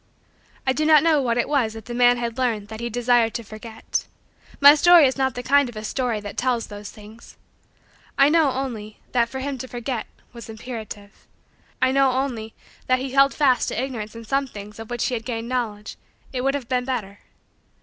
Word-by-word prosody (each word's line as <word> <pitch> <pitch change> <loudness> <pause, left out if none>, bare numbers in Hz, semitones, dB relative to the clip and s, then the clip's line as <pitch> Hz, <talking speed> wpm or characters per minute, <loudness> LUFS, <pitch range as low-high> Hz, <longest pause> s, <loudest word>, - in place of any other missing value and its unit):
I 260 - +2
do 305 - -1
not 305 -1 +6
know 315 -3 +3
what 235 -2 0
it 240 - +1
was 255 -7 +1
that 225 -1 -10
the 240 - -6
man 245 0 +4
had 235 +1 -4
learned 220 -5 -1
that 220 0 -7
he 235 0 -3
desired 240 -1 +2
to 235 - -3
forget. 220 +1 -5 0.5
My 285 +1 +10
story 340 +1 +7
is 260 - +1
not 265 -1 0
the 245 - -5
kind 280 0 +3
of 240 - -12
a 215 - -6
story 240 0 -1
that 205 -1 -8
tells 245 -2 0
those 205 0 -9
things. 215 +2 -14 0.8
I 275 0 +6
know, 315 -1 +4
only, 235 -5 -5
that 235 -1 +2
for 265 +1 -5
him 275 -1 -4
to 260 - -6
forget 245 -1 -4 0.3
was 235 -1 -10
imperative. 220 -2 -9 0.6
I 260 - +4
know, 270 -1 +3
only, 245 -5 -3 0.3
that 255 - +4
had 260 - -4
he 265 - -5
held 275 +1 +4
fast 270 -4 +3
to - - -2
Ignorance 235 -5 -4
in 230 0 -9
some 275 +4 0
things 210 -2 -10
of 225 - -8
which 240 -1 -2
he - - -1
had 225 -2 -3
gained 230 -1 -4
knowledge, 220 -4 -3 0.4
it 250 - -2
would 275 +1 +1
have 270 -4 -5
been 250 0 0
better. 215 -6 -4
245 Hz, 215 wpm, -23 LUFS, 225-265 Hz, 0.8 s, My